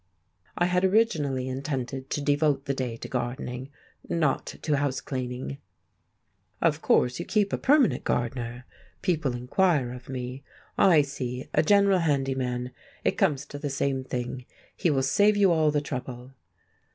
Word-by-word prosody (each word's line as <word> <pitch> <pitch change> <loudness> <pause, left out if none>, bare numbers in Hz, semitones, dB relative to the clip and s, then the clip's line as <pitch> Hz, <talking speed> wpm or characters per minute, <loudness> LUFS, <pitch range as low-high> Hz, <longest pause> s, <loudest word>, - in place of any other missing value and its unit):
I 175 - +3
had 180 +1 +1
originally 160 - +2
intended 135 0 -4
to 145 - -2
devote 145 -1 +1
the 140 - 0
day 125 -4 -3
to - - -7
gardening, 125 +1 -4 0.4
not 155 -5 +1 0.2
to 150 -2 +1
house 140 -2 0
cleaning. 130 0 -5 1.0
"Of - - +1
course 125 0 +2
you - - -3
keep 210 -2 +1
a - - +2
permanent 285 -2 +3
gardener?" 120 0 -2 0.4
people 150 -8 0
inquire 130 +1 +1
of 125 0 -11
me. 130 +1 -5 0.3
"I 165 -6 +6
see; 130 -2 -5
a 155 - +4
general 200 +2 +4
handy 140 -5 +1
man; 125 -1 -3 0.3
it - - +3
comes 140 -2 +1
to 145 - -8
the 145 -1 -3
same 135 -1 -1
thing; 125 -1 -5 0.3
he 175 - +1
will 135 -3 +2
save 205 +10 +4
you 195 -3 +5
all 155 -2 +3
trouble." 130 -3 -4
135 Hz, 150 wpm, -27 LUFS, 125-155 Hz, 1.0 s, I